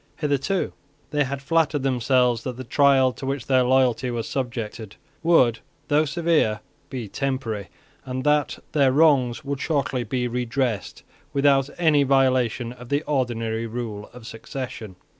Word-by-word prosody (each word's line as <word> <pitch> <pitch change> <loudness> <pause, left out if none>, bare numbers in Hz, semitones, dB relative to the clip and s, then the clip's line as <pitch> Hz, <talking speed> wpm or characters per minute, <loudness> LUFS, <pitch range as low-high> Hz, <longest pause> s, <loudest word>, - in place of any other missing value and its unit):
Hitherto 150 +6 -1 0.4
they 145 -1 +2
had 135 +1 -5
flattered 155 -2 +1
themselves 125 -2 +2
that 125 -2 -5
the 130 - -6
trial 135 0 +4
to 135 - -8
which 135 -2 -2
their 130 -1 +3
loyalty 130 0 +2
was 120 -2 -3
subjected 115 -5 -4 0.3
would, 130 -9 +4 0.3
though 150 +1 +3
severe, 155 -9 +1 0.3
be 125 -5 -5
temporary, 115 -4 -3 0.4
and 130 0 -4
that 150 -1 +2
their 140 -3 +3
wrongs 135 -5 +3
would 140 -1 -3
shortly 135 -5 -1
be 125 +2 -2
redressed 120 -2 -2 0.3
without 140 -1 +3
any 160 -4 +4
violation 130 -3 +2
of 125 -1 -13
the 145 +2 0
ordinary 115 -5 -1
rule 110 -3 -6
of 125 -2 -13
succession. 115 -3 -7
130 Hz, 140 wpm, -24 LUFS, 120-140 Hz, 0.4 s, trial